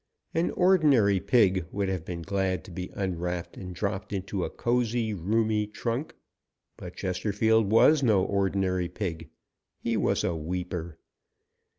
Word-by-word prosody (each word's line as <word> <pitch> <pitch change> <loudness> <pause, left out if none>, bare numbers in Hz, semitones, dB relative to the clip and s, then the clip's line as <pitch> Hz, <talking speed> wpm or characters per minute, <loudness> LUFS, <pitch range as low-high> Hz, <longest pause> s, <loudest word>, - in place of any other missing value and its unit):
An 165 +2 +1
ordinary 145 - +4
pig 95 -6 +3
would 100 -1 -1
have 95 -4 -2
been 85 0 -6
glad 95 -1 -1
to 100 - -12
be 90 +1 -5
unwrapped 90 -2 -3
and 90 -2 -8
dropped 100 +2 -3
into 95 -1 -3
a - - -2
cozy, 120 -2 0
roomy 105 +3 0
trunk, 120 +7 -4 0.6
but 90 0 -9
Chesterfield 105 +3 +1
was 145 +7 +6
no 110 -7 +3
ordinary 95 -2 0
pig. 85 -4 -5 0.5
He - - -2
was - - +1
a 85 - 0
weeper. 85 0 -4
95 Hz, 135 wpm, -27 LUFS, 90-110 Hz, 0.6 s, was